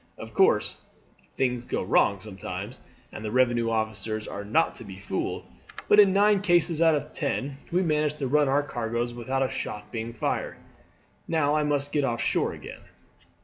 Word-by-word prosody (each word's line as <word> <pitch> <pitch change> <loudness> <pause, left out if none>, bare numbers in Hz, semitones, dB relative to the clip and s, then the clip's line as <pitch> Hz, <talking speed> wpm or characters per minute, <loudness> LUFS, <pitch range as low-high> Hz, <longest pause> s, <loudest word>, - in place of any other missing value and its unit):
Of - - -9
course 405 +6 +3 0.5
things 125 -2 0
go - - -2
wrong 100 -2 +2
sometimes 100 +1 -7 0.3
and 110 - -8
the 110 - -3
revenue 120 -1 +2
officers 110 -1 -2
are 100 - -5
not 115 +11 +2
to - - -8
be 95 -3 -9
fooled, 100 - -3 0.4
but 205 - +6
in 200 -2 +8
nine 205 0 +4
cases 175 -4 +2
out 165 -2 +5
of 150 +1 -4
ten 140 -2 -2
we 180 +2 +2
manage 150 -2 +1
to 145 - -3
run 145 +1 +3
our 145 +2 +3
cargoes 120 -2 -3
without 130 +3 -1
a 130 - 0
shot 105 0 -5
being 115 0 -4
fired. 115 - -2 0.7
Now 155 -3 +2
I 155 - +2
must 145 -1 0
get 145 - +1
off 120 -3 -1
shore - - 0
again." - - -10
130 Hz, 180 wpm, -26 LUFS, 115-150 Hz, 0.7 s, in